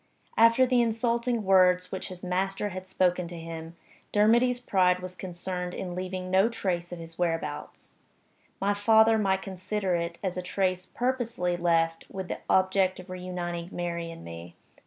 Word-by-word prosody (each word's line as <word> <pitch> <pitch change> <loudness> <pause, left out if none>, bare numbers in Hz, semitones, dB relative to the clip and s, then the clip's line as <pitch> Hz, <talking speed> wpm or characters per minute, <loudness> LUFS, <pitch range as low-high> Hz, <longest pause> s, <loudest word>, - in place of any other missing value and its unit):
After 230 +3 +6
the 250 -1 +3
insulting 235 0 0
words 180 -1 +4
which 190 - -4
his 180 -1 -10
master 195 +3 -1
had 185 -1 -7
spoken 180 -1 +1
to 175 0 -8
him, 165 0 -7 0.4
Dermody's 235 +4 +4
pride 185 -6 +3
was 180 0 -7
concerned 180 0 -5
in 180 -2 -4
leaving 185 0 -4
no 190 +4 +4
trace 180 -6 -2
of 175 - -5
his 165 0 -10
whereabouts; 165 -4 -3 0.7
my 200 +1 +2
father 220 +2 +5
might 190 -2 +1
consider 190 0 -2
it 170 0 -2
as 185 -2 -2
a - - -1
trace 185 0 -1
purposely 235 -8 -1
left 165 -1 +1
with 190 -2 -6
the - - -3
object 190 0 +3
of 185 0 -10
reuniting 175 -1 -4
Mary 170 -1 -3
and 165 0 -10
me. 85 +1 -9
185 Hz, 160 wpm, -28 LUFS, 175-205 Hz, 0.7 s, After